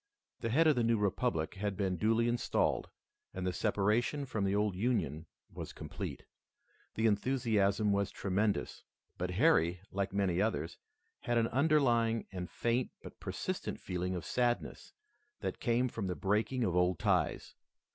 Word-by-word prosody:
The 115 - -2
head 155 +8 +4
of 155 -2 +5
the 120 - +1
new 115 0 +3
republic 100 -4 0
had 100 0 -3
been 95 -3 0
duly 115 +6 +2
installed, 120 0 0 0.5
and 95 0 -3
the 90 - 0
separation 110 +8 +1
from 110 -6 -2
the 100 +1 +1
old 105 -2 +1
Union 90 - -1 0.3
was - - -7
complete. - - -6 0.7
The 110 - 0
enthusiasm 105 -2 +2
was 100 -1 +1
tremendous, 100 +2 -1 0.4
but 90 - -1
Harry, 90 - +3
like 100 0 -1
many 95 -2 +1
others, 105 -6 -1 0.4
had 120 0 0
an 115 0 +2
underlying 120 -6 +3
and 90 -2 -5
faint 120 +1 0
but - - -11
persistent - - -4
feeling 90 0 -3
of 90 - -5
sadness 120 -1 -1 0.5
that - - -3
came 120 +1 +2
from 110 -5 -4
the 90 - -2
breaking 110 +6 0
of 90 -5 0
old 90 -1 +3
ties. - - 0
105 Hz, 155 wpm, -33 LUFS, 95-120 Hz, 0.7 s, of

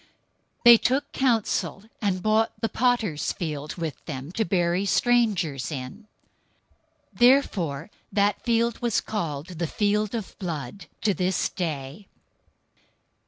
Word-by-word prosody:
027:007 - - -31 0.5
They 235 -1 +10
took 270 +3 0
counsel, 220 - 0 0.2
and 190 -4 0
bought 215 0 +1
the 225 0 -1
potter's 230 -11 +1
field 150 -3 -4
with 165 -4 -5
them, 140 0 -6
to 220 +4 0
bury 175 0 +1
strangers 200 - +1
in. 135 - -7 1.1
027:008 - - -19
Therefore 200 - +3 0.2
that 205 0 +1
field 235 -1 +1
was 235 -3 +1
called 160 -8 -4
"The 170 - 0
Field 210 +4 0
of 220 -4 -5
Blood" 170 -2 -5
to 210 - +2
this 185 0 0
day. 155 +1 -5
195 Hz, 125 wpm, -25 LUFS, 160-225 Hz, 1.1 s, They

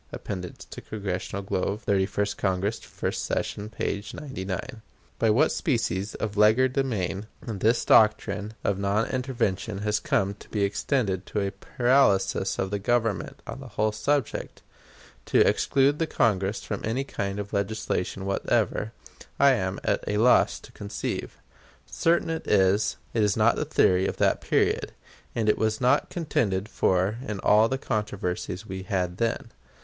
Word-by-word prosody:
(Appendix 90 -3 -6
to - - -9
Congressional 100 -1 -4
Globe, 100 +2 -2
Thirty 95 -2 +1
first 100 0 -1
Congress, 95 +3 -1
first - - -4
session, 105 +1 -2
p. 100 -2 -3
99.) 110 - -5 0.4
By 115 - +3
what 135 +9 +4
species 110 - -1
of 105 -2 -3
legerdemain 110 -3 +2 0.2
this 110 +1 +1
doctrine 105 0 +3
of 100 -1 0
non 100 +3 +1
intervention 110 -6 -2
has 105 -1 +1
come 100 0 0
to 105 +1 -6
extend 100 0 0
to 105 - -2
a 100 -1 -1
paralysis 120 +2 +2
of 95 0 -2
the 100 - -1
Government 115 0 -1
on - - -7
the 135 - -9
whole 110 -1 0
subject, 120 +5 -2 0.6
to - - +4
exclude 140 +2 +2
the 165 - +1
Congress 100 -5 +1
from - - -4
any 115 +5 -1
kind 100 -7 -4
of 100 0 -6
legislation 100 -2 -2
whatever, 100 +2 0 0.5
I - - +7
am - - -1
at - - 0
a 105 - 0
loss 120 +4 +4
to - - -14
conceive. 100 0 -5 0.5
Certain 165 0 +1
it 160 - -4
is, 100 +1 +3 0.2
it 115 - 0
was 105 -2 +2
not - - +4
the - - -2
theory 95 +1 +3
of - - -4
that - - +2
period, - - +1 0.4
and 110 -2 0
it 105 - +3
was 110 0 +1
not 125 - +3
contended 115 - -1
for 95 +1 +1
in 105 -2 -3
all 110 +2 +5
the 135 - 0
controversies 105 -5 -3
we 95 -2 -6
had 90 -3 -2
then. 115 0 -1
105 Hz, 155 wpm, -26 LUFS, 95-115 Hz, 0.6 s, I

